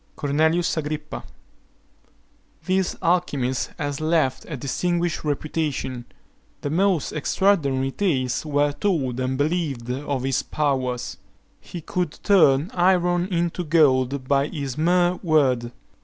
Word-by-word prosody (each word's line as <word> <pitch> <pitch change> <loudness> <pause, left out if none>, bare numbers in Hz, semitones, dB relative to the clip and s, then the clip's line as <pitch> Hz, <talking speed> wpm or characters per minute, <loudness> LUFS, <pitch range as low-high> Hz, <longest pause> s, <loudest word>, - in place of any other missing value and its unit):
CORNELIUS 160 +4 +1
AGRIPPA. 150 0 -4 1.4
This 185 0 0
alchymist 145 -8 0
has 145 0 -3
left 155 -5 +1
a 150 - -4
distinguished 175 +6 -1
reputation. 145 -4 -2 0.6
The 145 - -3
most 185 -1 +1
extraordinary 140 -5 +1
tales 135 -9 0
were 145 -1 +1
told 145 - -1
and 130 +1 -1
believed 145 -5 -1
of 135 0 -3
his 135 -1 +1
powers. 130 -4 -2 0.4
He 175 - -8
could 175 0 -3
turn 160 -3 +4
iron 175 -1 +2
into 175 -1 -1
gold 140 -5 +2
by 140 +1 +2
his 140 -5 -5
mere 175 +3 +2
word. 130 -8 +2
150 Hz, 110 wpm, -23 LUFS, 135-175 Hz, 1.4 s, turn